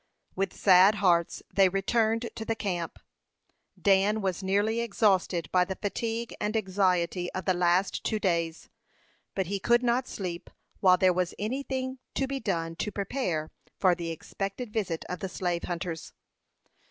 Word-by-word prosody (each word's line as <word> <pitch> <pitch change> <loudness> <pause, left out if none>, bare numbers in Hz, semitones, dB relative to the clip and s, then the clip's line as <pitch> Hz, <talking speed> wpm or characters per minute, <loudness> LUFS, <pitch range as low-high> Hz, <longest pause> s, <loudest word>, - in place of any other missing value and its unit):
With 195 +1 -1
sad 190 +2 +6
hearts 175 -5 +2
they 195 -1 +5
returned 225 +4 +1
to 220 - -5
the 225 0 -1
camp. 180 -6 -3 0.8
Dan 200 +1 +3
was 190 -1 -1
nearly 205 +4 +1
exhausted 195 -7 +1
by 180 -1 +4
the 190 +1 -4
fatigue 225 +4 -3
and 210 +2 0
anxiety 185 -3 0
of 185 - -4
the 185 - +3
last 180 +2 +1
two 215 - 0
days; 170 -5 -1 0.7
but 190 - 0
he 200 +3 -2
could 240 +4 +3
not 245 +1 +1
sleep 175 -3 -5 0.3
while 185 -2 +6
there 185 -1 +4
was 180 0 -1
any 235 +7 -2
thing 260 -1 -4 0.2
to 270 - +1
be 270 0 -3
done 165 -7 -2
to 210 - -2
prepare 195 - -2 0.3
for 185 -2 +4
the 170 -1 -4
expected 195 +7 -5
visit 185 -7 -2
of 180 - -4
the 190 - -4
slave 175 -2 -2
hunters. 170 -2 -5
195 Hz, 160 wpm, -28 LUFS, 180-220 Hz, 0.8 s, sad